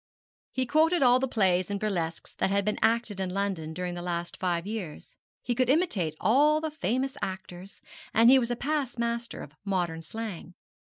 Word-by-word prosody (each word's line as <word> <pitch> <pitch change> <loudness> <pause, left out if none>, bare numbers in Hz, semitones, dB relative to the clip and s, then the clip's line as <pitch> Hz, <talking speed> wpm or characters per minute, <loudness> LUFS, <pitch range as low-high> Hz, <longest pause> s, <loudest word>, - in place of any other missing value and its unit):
He 260 - -1
quoted 315 +4 +3
all 250 0 +6
the 265 - 0
plays 185 -6 +2
and 200 0 -2
burlesques 175 -6 -3
that - - 0
had 200 0 +1
been 210 - -1
acted 225 -2 +1
in 190 -1 -1
London 185 -4 -2
during 180 +2 -4
the 175 - -5
last 175 -1 -4
five 175 -2 -1
years; 200 -7 -6 0.3
he 245 - 0
could 250 +1 +1
imitate 225 - +1
all 290 +9 +4
the 315 0 -3
famous 265 -2 -1
actors; 190 0 -6 0.3
and 225 +2 +5
he 265 +2 +8
was 235 -2 -1
a 240 - 0
past 275 -1 -2
master 235 0 -2
of 145 - -12
modern 175 -5 -1
slang. 185 -1 -7
210 Hz, 190 wpm, -28 LUFS, 180-250 Hz, 0.3 s, he